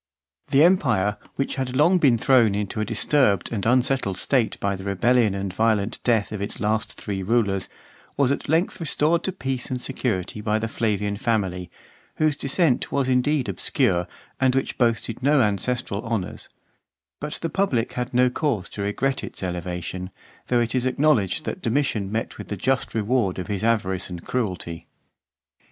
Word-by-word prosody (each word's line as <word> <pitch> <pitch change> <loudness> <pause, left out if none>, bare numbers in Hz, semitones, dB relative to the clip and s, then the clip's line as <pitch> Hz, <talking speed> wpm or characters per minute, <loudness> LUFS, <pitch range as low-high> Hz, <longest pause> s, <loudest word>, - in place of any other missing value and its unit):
The 140 +2 +5
empire, 105 - +3 0.2
which 135 +1 -2
had 130 -1 -1
been - - -2
long 175 +6 +5 0.2
thrown 115 -4 +4
into 105 +1 -2
a - - 0
disturbed 110 -2 +2
and 100 -4 -2
unsetted 125 -5 +2
state, 125 +2 +1
by 100 0 0
the 95 - -8
rebellion 105 +2 +2
and 100 -1 -3
violent 110 0 +1
death 115 -4 +2
of 105 -2 -4
its 100 - -3
three - - -11
last 110 +1 -2
rulers, 100 0 0 0.5
was 140 -2 +3
at 140 - -3
length 165 +4 +1
restored 165 +1 +1
to 190 - 0
peace 135 -8 -3
and 125 - -2
security 110 -6 -2
by 105 0 +1
the 110 +1 -2
Flavian 105 -2 -1
family, 95 -6 -1 0.5
whose 155 -1 +2
descent 140 -1 +1
was 140 -2 +1
indeed 130 +2 +2
obscure, 90 -10 +1 0.3
and 130 -1 +3
which 135 - -1
boasted 115 -1 0
no 145 +2 +4
ancestral 105 0 0
honours; 115 -6 -4 0.7
but 150 0 -4
the 165 - -3
public 145 -12 0
had 125 0 -3
no 125 0 +3
cause 125 - -1
to 100 - -6
regret 130 +7 -1
its - - -7
elevation; 90 0 -4 0.4
though 125 - +2
it 120 - -1
is 130 0 +1
acknowledged 130 -7 +2
that - - -4
Domitian 115 -6 0
met 110 +1 -3
with - - -7
the 105 - -4
just 130 +5 0
reward 110 -3 +1
of 90 - -4
his 100 -1 -3
avarice 95 -5 0
and 90 -2 -8
cruelty. 90 -8 -3
115 Hz, 170 wpm, -24 LUFS, 100-130 Hz, 0.7 s, The